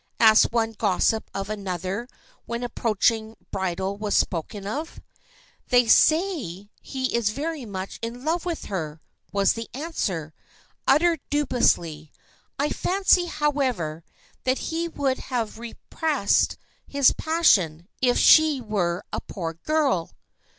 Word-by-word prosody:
asked 220 -1 +6
one 225 -1 +1
gossip 220 +1 0
of 195 0 -4
another 195 +1 -4 0.4
when 235 0 -3
an - - -2
approaching 225 -1 0 0.2
bridal 190 0 -2
was 210 0 -2
spoken 195 +3 -1
of. 295 +11 -5 0.7
"They 245 -1 +4
say 250 - +2
he 260 -2 -3
is 235 -3 +2
very 290 +3 -4
much 190 -1 -6
in 240 +3 -6
love 330 +2 0
with 345 -2 -4
her!" 160 -6 -4 0.3
was 200 -1 +3
the 230 0 -6
answer, 190 - -3 0.5
uttered 330 +3 +4
dubiously. 175 - +1 0.5
"I 285 +2 0
fancy, 370 0 +2
however, 260 - -1 0.4
that 260 +1 +1
he 330 +1 -2
would 275 -5 -1
have 230 -4 -3
repressed 235 +1 0 0.3
his 280 -2 +4
passion, 185 - +2
if 245 -1 +3
she 310 -3 +6
were 195 -6 -1
a - - -2
poor 165 -4 -5
girl." 275 - 0
230 Hz, 125 wpm, -24 LUFS, 195-290 Hz, 0.7 s, asked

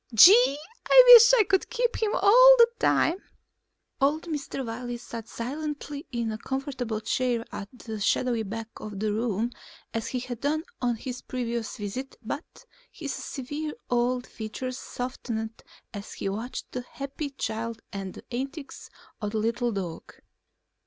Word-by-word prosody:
Gee, 365 - +8 0.3
I - - +9
wish 470 0 +10
I - - +7
could 385 -1 +1
keep 485 -1 0
him 430 -1 +1
all - - +8
the 470 -1 +8
time." 335 - +3 0.8
Old 295 +4 +2
Mr. 290 -5 -4
Wiley 240 +1 -5
sat 230 -1 -8
silently 290 +3 -5
in 235 -3 -2
a 215 - -5
comfortable 260 -4 -3
chair 235 +1 0
at 200 -1 -6
the 220 -3 -7
shadowy 235 +3 +1
back 220 +2 -5
of 210 -2 -7
the 210 0 0
room 225 +1 -1 0.4
as 225 -1 -2
he 255 - -2
had 245 -2 -6
done 310 +2 0 0.2
on 245 -1 +1
his 250 +2 -6
previous 235 -3 -4
visits 220 +6 -6
but 290 - -7 0.3
his 290 -4 -5
severe 295 +3 -5 0.2
old 245 +1 +1
features 250 +4 -6
softened 230 -3 -5 0.3
as 200 -1 -7
he - - -4
watched 225 +6 -5
the 250 - -4
happy 275 +3 -6
child 230 -4 -4
and 195 -2 -5
the - - -13
antics 275 +4 -6 0.3
of 210 0 -3
the - - 0
little 230 +2 0
dog. 185 -6 -6
245 Hz, 150 wpm, -27 LUFS, 225-285 Hz, 0.8 s, wish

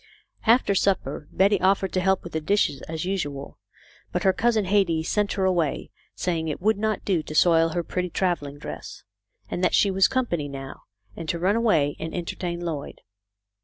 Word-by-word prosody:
After 230 -3 +5
supper 180 -7 0
Betty 200 +2 +3
offered 190 0 +2
to 185 - +1
help 190 0 +2
with 175 - -9
the 160 - -1
dishes 155 -6 +1
as 160 +1 -3
usual, 145 -8 -4 0.5
but - - -1
her 190 - +4
cousin 225 -2 +1
Hetty 185 -5 +2
sent 205 +4 0
her 190 -2 0
away, 175 -5 0 0.2
saying 165 -3 -1
it 150 - -3
would 210 +2 +1
not 215 -1 -1
do 185 -5 +1
to 155 - -8
soil 165 0 +5
her 175 - -1
pretty 180 +1 -3
travelling 165 -6 -1
dress; 145 - -8 0.5
that 180 +1 +1
she 200 - +4
was 190 0 +4
company 240 - -1
now, 135 -1 -8 0.3
and 160 - -6
to 170 - 0
run 185 +5 +2
away 165 -12 +2
and 160 - -5
en 175 -2 -3
tertain 175 0 -4
Lloyd. 160 -5 -5
180 Hz, 185 wpm, -25 LUFS, 160-195 Hz, 0.5 s, After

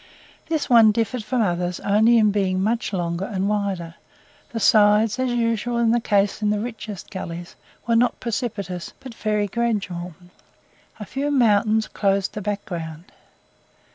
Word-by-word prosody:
This 315 -2 -1
one 230 -3 +7
differed 230 +2 -2
from 230 +2 0
others 175 -2 -1
only 220 +4 +4
in 215 -2 +4
being 190 -2 0
much 225 +4 0
longer 175 -1 -2
and 195 -1 -2
wider; 200 -5 -2 0.6
the 230 - -4
sides, 210 +1 +4
as 260 0 +1
is 240 - -1
usually 230 0 +1
the 240 - +3
case 205 -2 +1
in 210 - +1
the 210 0 +1
richest 215 -3 -7
gullies, 175 -2 -7 0.3
were 230 0 +1
not 245 +2 +2
precipitous, 200 -6 -4
but 260 -3 -10
very 210 -2 -1
gradual; 195 -6 -2 0.8
a 210 - -6
few 275 +7 -3
mountains 220 -4 +3
closed 195 -1 0
the 210 - -5
background. 175 -5 -5
210 Hz, 150 wpm, -22 LUFS, 190-230 Hz, 0.8 s, one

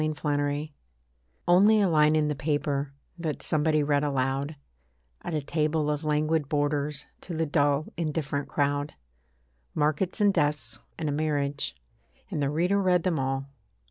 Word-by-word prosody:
ONLY 155 - +1 0.2
A 150 -2 +1
LINE 145 +1 -1 0.8
Only 200 +5 +6
a 200 - +4
line 155 -2 +4
in 155 -1 +2
the 150 - 0
paper, 145 -1 -1 0.3
That 160 -3 -3
somebody 155 -1 +2
read 145 0 +2
aloud, 140 +1 -1 0.7
At 165 - -4
a 150 - -1
table 150 0 0
of 150 +1 -3
languid 155 -1 +1
boarders, 145 0 -1 0.2
To 170 -3 -6
the 160 - +1
dull 145 -1 +2
indifferent 150 -3 -2
crowd. 145 0 -1 0.8
Markets 155 +7 0
and 205 -1 +4
deaths 145 -8 0 0.2
and 160 - -3
a - - 0
marriage: 145 - -1 0.6
And 150 - -2
the 140 - +1
reader 180 +7 +1
read 180 -3 +3
them 175 -5 0
all. 135 0 -1
150 Hz, 155 wpm, -27 LUFS, 145-160 Hz, 0.8 s, Only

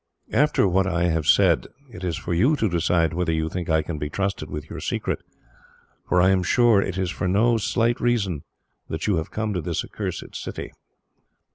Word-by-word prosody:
"After 150 -8 +3
what 95 +1 +2
I 85 -2 +1
have 80 -2 -1
said, - - +4 0.2
it 95 -5 -10
is 85 -3 -1
for 85 - -4
you 120 - +3
to 110 - +1
decide 85 -2 +1
whether 90 0 0
you 80 0 0
think 85 0 -4
I 80 -1 +3
can 80 -2 -5
be 75 0 -3
trusted 100 +4 -2
with 75 0 -6
your - - -7
secret, - - -2 0.9
for 90 - +3
I 95 +2 +5
am 95 -1 +3
sure 115 +2 +4
it 95 -2 -3
is 95 -1 -1
for 95 - -2
no 115 +5 +3
slight 115 +2 +1
reason 100 -10 0 0.5
that 80 - -3
you 105 -5 +2
have 80 - -3
come 110 -1 -2
to 90 - -1
this 85 0 -2
accursed - - -6
city." - - -6
90 Hz, 205 wpm, -24 LUFS, 80-105 Hz, 0.9 s, I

